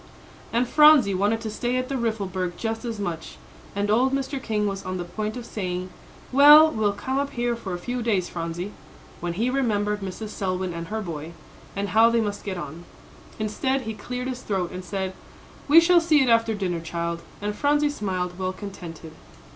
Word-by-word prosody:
And 240 +2 +1
Phronsie 300 -9 +6
wanted 205 +4 +1
to 220 -1 -4
stay 240 +3 -1
at 255 0 -1
the 275 - -3
Riffelberg 195 -7 -2
just 225 -1 -3
as 230 -2 -3
much; 175 -5 -5 0.4
and 205 +1 0
old 255 +5 +3
Mr. 275 0 -2
King 210 -3 -1
was 195 -1 -3
on 185 0 -3
the 175 - -3
point 215 +6 -4
of 240 - -7
saying, 185 -4 -4 0.4
"Well, 295 +4 +9
we'll 215 -4 +1
come 260 +7 -2
up 280 0 -1
here 240 0 0
for 195 -6 -5
a - - -4
few 245 +7 -4
days, 205 -6 +1
Phronsie," 170 +3 -4 0.5
when 175 0 -3
he 230 +8 0
remembered 210 -6 0
Mrs. 195 +3 -5
Selwyn 185 -3 -2
and 170 0 -5
her 220 +4 -3
boy, 165 -3 -6 0.4
and 200 0 -2
how 225 +4 +6
they 235 0 +2
must 205 -2 -2
get 190 -3 -4
on. 170 0 -7 0.5
Instead, 260 +5 -1
he 220 -2 -4
cleared 250 +4 -5
his 255 -1 -4
throat, 185 -4 -2
and 185 0 -6
said, 190 +1 -3 0.5
"We 305 +3 +9
shall 345 +1 +5
see 310 -4 +4
it 255 - +1
after 230 -1 +3
dinner, 180 -4 -2
child," 170 +1 -3 0.2
and 205 0 -3
Phronsie 290 +3 +2
smiled, 185 -7 -3
well 185 0 -1
contented. 175 -5 -9
210 Hz, 195 wpm, -25 LUFS, 185-245 Hz, 0.5 s, Well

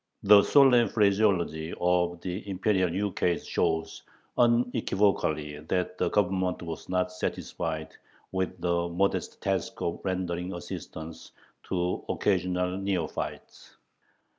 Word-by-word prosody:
The 100 0 +8
solemn 125 -1 +5
phraseology 100 -6 +1
of 90 -1 +1
the 95 +3 -5
Imperial 95 -1 +1
ukase 90 -1 -1
shows 80 0 -1 0.3
unequivocally 105 -11 +1
that 90 +3 -2
the - - +2
Government 95 -3 0
was 80 -1 -7
not 90 0 0
satisfied 80 -3 -4 0.4
with 95 -1 -2
the 85 0 0
modest 95 +3 -1
task - - -1
of 85 - -2
rendering 90 -1 -2
assistance 80 -2 -8 0.3
to 90 -1 -1
occasional 90 -1 0
neophytes. 95 -5 -4
90 Hz, 105 wpm, -28 LUFS, 85-100 Hz, 0.4 s, The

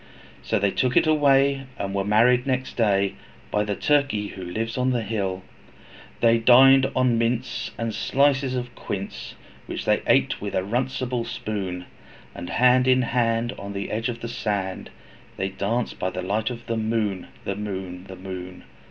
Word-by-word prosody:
So 110 - 0
they 100 -1 +1
took 125 +4 +1
it - - +5
away, 140 -3 +3
and 100 -1 -3
were 100 0 0
married 120 +5 +3
next 130 0 -1
day, 100 -4 +2 0.4
By 105 - +1
the 105 -1 -2
Turkey 140 -8 +1
who 95 - -8
lives 110 +6 -3
on 125 0 +1
the 120 -3 0
hill. 95 -3 -2 0.8
They 115 0 +5
dined 135 +3 +7
on 125 -3 +2
mince, 120 +1 -1
and 115 -1 -2
slices 135 0 +2
of 125 -1 -4
quince, 95 - -6 0.3
Which - - -5
they - - +2
ate - - +2
with - - -4
a 95 - +1
runcible 125 +2 -1
spoon; 95 -6 -4 0.5
And 90 0 -7
hand 125 +1 +4
in 130 0 +4
hand, 115 0 0
on 100 0 -6
the 100 0 -4
edge 115 +3 -1
of 115 -1 -5
the 115 - -4
sand, 100 -5 -3 0.5
They 95 - -1
danced 105 +5 -2
by 95 - 0
the 90 0 -5
light 105 +4 -1
of 120 -1 -7
the 115 - -2
moon, 110 -4 -1 0.2
The 100 - -2
moon, 95 -3 -5
The 95 - -9
moon! 90 -1 -8
115 Hz, 175 wpm, -24 LUFS, 100-125 Hz, 0.8 s, dined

